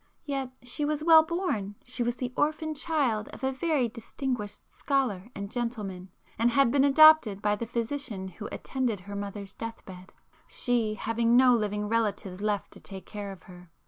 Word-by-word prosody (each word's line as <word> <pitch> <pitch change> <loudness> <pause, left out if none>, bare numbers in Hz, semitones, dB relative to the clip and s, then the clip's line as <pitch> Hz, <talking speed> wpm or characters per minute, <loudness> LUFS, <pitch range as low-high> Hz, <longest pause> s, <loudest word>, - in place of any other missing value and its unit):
"Yet 275 -3 -2
she 250 +4 -2
was 300 0 -1
well 320 -1 +8
born; 315 - -2
she 250 0 -1
was 240 0 0
the 250 0 -4
orphan 310 +1 0
child 280 -9 0
of - - -12
a 265 - +1
very 275 -2 +1
distinguished 230 -1 -4
scholar 245 -8 -1
and 200 +1 -6
gentleman, 210 -7 -4 0.3
and 230 +1 +4
had 255 0 +3
been 275 0 +4
adopted 285 -7 +7
by 205 0 +1
the 230 +2 -5
physician 235 -4 -3
who 195 +3 -8
attended 245 -7 -2
her 200 +2 -8
mother's 200 -1 -5
deathbed, 190 -5 -9 0.4
she 230 -3 0
having 230 +1 +2
no 255 -1 +7
living 210 -2 0
relatives 205 -4 -1
left 210 -1 -1
to - - -11
take 190 -1 -6
care 205 -2 -6
of 190 -4 -12
her. 180 -1 -14
230 Hz, 175 wpm, -28 LUFS, 205-270 Hz, 0.4 s, well